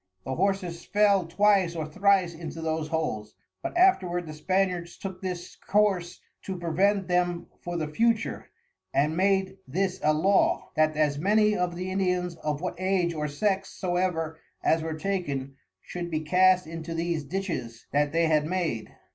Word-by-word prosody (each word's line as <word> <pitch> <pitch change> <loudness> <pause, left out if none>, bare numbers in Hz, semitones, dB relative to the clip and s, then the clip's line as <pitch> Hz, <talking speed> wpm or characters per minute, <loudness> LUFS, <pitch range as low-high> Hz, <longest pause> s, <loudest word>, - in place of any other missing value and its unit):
The 130 - -2
Horses 180 -1 -1
fell 200 -4 +3
twice 190 -1 +3
or 160 -2 -2
thrice 190 +1 +2
into 165 0 -7
those 160 -1 -2
holes, 110 -10 -3 0.3
but 340 +1 -4
afterward 180 - +3
the 155 - -7
Spaniards 180 +1 -1
took 190 -2 -7
this 180 -2 -5
Course 195 -4 +1 0.2
to 190 -1 -5
prevent 190 +4 +1
them 175 -1 +1
for 175 0 -4
the 155 -2 -2
future; 225 +8 0 0.5
and 150 +3 +2
made 190 +1 +1
this 185 +7 -1
a 155 - +4
Law, 190 +6 +2
that 155 0 +2
as 145 -2 +2
many 210 +4 +3
of 180 -2 -1
the 185 +1 -4
Indians 180 -2 0
of 150 -1 -3
what 180 -1 -4
Age 185 -2 +1
or 150 -1 -2
Sex 195 +6 0
soever 175 -3 -1 0.2
as 160 - +3
were 160 0 -3
taken, 145 -8 -2 0.3
should 175 -1 -5
be 155 -2 -1
cast 180 +3 +4
into 165 +1 -6
these 165 -2 -1
Ditches 145 - -4
that 145 0 +2
they 165 +1 +2
had 155 -1 +2
made. 165 -11 -2
175 Hz, 165 wpm, -27 LUFS, 160-190 Hz, 0.5 s, a